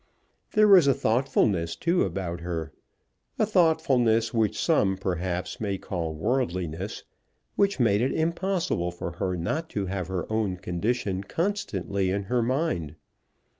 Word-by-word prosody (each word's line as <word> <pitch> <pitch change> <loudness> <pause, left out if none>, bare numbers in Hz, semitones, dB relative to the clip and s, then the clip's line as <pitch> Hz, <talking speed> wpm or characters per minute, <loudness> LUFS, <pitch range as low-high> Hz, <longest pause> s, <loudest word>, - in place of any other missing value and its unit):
There 215 0 +5
was 185 -7 +7
a 140 - +4
thoughtfulness 110 -8 +1
too 170 +1 +1
about 85 -2 -3
her, 80 -2 -4 0.7
a - - +3
thoughtfulness 140 - +3
which 110 -3 +1
some, 100 - +2
perhaps, 90 0 -3
may 100 -3 -1
call 85 -4 -4
worldliness, 90 -3 -2 0.5
which 200 -6 +2
made 105 -3 +3
it 130 - +1
impossible 170 - 0
for 85 0 -5
her 90 0 -1
not 155 - -2
to 100 - 0
have 95 -2 -3
her 95 -2 -3
own 105 -4 0
condition 95 +2 -2
constantly 100 - -1
in 100 +2 -1
her 120 +5 0
mind. 120 - -1
100 Hz, 135 wpm, -26 LUFS, 90-140 Hz, 0.7 s, was